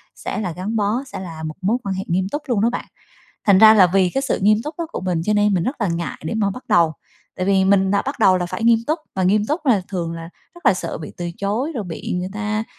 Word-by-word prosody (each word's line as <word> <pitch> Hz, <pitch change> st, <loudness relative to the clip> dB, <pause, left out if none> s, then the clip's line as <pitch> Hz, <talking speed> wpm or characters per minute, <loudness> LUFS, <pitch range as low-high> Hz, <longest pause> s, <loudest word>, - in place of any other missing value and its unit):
sẽ -, -, -5 dB
là 190 Hz, -5 st, -2 dB
gắn 185 Hz, +7 st, -4 dB
bó, 215 Hz, +4 st, 0 dB
sẽ 275 Hz, -, -8 dB
là 165 Hz, -4 st, -7 dB
một 155 Hz, -1 st, -5 dB
mối 210 Hz, +6 st, +1 dB
quan 195 Hz, -1 st, -2 dB
hệ 190 Hz, -, -3 dB
nghiêm 185 Hz, +2 st, 0 dB
túc 295 Hz, -, -3 dB
luôn 235 Hz, -6 st, +1 dB
đó 230 Hz, -, +3 dB
bạn. -, -, -4 dB, 0.6 s
Thành 200 Hz, -2 st, +6 dB
ra 220 Hz, +1 st, +9 dB
là 195 Hz, -4 st, +7 dB
vì 190 Hz, -2 st, +4 dB
cái 270 Hz, -, +1 dB
sự 275 Hz, -, 0 dB
nghiêm 210 Hz, +1 st, +5 dB
túc 300 Hz, +2 st, -5 dB
đó 335 Hz, -, -2 dB
của -, -, -4 dB
mình 180 Hz, -3 st, -1 dB
cho 210 Hz, -, +1 dB
nên 210 Hz, -1 st, +3 dB
mình 175 Hz, -, +1 dB
rất 265 Hz, 0 st, -3 dB
là 205 Hz, -, +1 dB
ngại 170 Hz, 0 st, -3 dB
để 160 Hz, -, -3 dB
mà 210 Hz, -3 st, +1 dB
bắt 250 Hz, +7 st, -8 dB
đầu, 165 Hz, -2 st, +4 dB, 0.4 s
tại 185 Hz, -, -2 dB
vì 195 Hz, -1 st, +3 dB
mình 190 Hz, 0 st, +3 dB
đã 200 Hz, 0 st, +2 dB
bắt 275 Hz, 0 st, -5 dB
đầu 190 Hz, -5 st, +5 dB
là 175 Hz, -1 st, -1 dB
phải 225 Hz, -, -4 dB
nghiêm 230 Hz, -1 st, +5 dB
túc, 310 Hz, +3 st, 0 dB, 0.2 s
mà 190 Hz, -, -1 dB
nghiêm 205 Hz, +3 st, +2 dB
túc 305 Hz, +3 st, -2 dB
là 220 Hz, -7 st, +3 dB
thường 175 Hz, -4 st, -3 dB
là 165 Hz, 0 st, -7 dB, 0.3 s
rất 345 Hz, -4 st, -8 dB
là 195 Hz, -, +6 dB
sợ -, -, -5 dB
bị 150 Hz, -, -8 dB
từ 175 Hz, -1 st, -4 dB
chối, 220 Hz, +10 st, -2 dB
rồi 225 Hz, -5 st, -3 dB
bị 165 Hz, -3 st, -5 dB
người 180 Hz, -, -3 dB
ta 215 Hz, +1 st, -2 dB
200 Hz, 290 wpm, -20 LUFS, 185-225 Hz, 0.6 s, ra